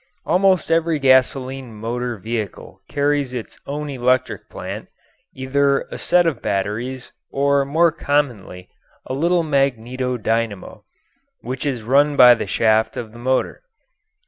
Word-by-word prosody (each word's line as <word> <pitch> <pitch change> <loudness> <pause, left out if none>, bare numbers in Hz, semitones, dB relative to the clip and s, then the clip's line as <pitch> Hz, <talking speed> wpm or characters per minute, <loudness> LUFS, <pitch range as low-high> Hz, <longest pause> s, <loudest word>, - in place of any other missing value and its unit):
Almost 185 -2 +2
every 165 -1 +2
gasoline 130 -2 +1
motor 120 +2 -4
vehicle 110 0 -6
carries 145 -2 0
its 120 - -7
own 150 +1 -4
electric 125 -5 -1
plant, - - -7 0.5
either 140 +1 +1
a - - -6
set 175 0 +3
of 155 -8 -1
batteries 115 +7 -3 0.2
or 140 0 +1
more 165 +4 +3
commonly 125 - -2 0.4
a - - -5
little 170 +5 +1
magneto 130 -3 -1
dynamo, 110 -3 -3 0.6
which 130 +3 -4
is 125 -5 -3
run 140 +5 +3
by 125 -2 +9
the 115 - -4
shaft 110 0 +1
of 110 -2 -6
the 120 - -13
motor. 130 +2 -1
130 Hz, 130 wpm, -20 LUFS, 115-145 Hz, 0.6 s, by